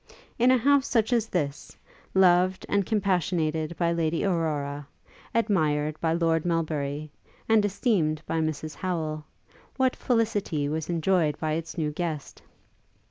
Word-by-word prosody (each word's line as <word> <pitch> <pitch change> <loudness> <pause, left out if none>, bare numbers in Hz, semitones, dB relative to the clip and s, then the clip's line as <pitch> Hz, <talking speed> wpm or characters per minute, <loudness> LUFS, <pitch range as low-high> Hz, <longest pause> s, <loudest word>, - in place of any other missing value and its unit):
In 245 +2 +5
a 260 - +6
house 280 +3 +3
such 225 0 +1
as 230 -2 +2
this, 150 -8 -3 0.4
loved 185 0 +4
and 200 -2 +1
compassionated 170 -6 0
by 170 -1 +1
Lady 165 +2 0
Aurora, 145 -6 -1 0.5
admired 155 -9 +1
by 160 - +1
Lord 165 -1 +1
Melbury, 155 -3 -2 0.4
and 220 -1 +4
esteemed 185 -7 0
by 165 - -1
Mrs 155 -1 -2
Howel, 155 -4 -3 0.5
what 260 -1 +2
felicity 210 - 0
was 155 +2 -3
enjoyed 165 -2 +1
by 155 -1 -1
its 165 +2 -4
new 155 -2 -1
guest! 155 -2 -5
165 Hz, 135 wpm, -26 LUFS, 155-195 Hz, 0.5 s, a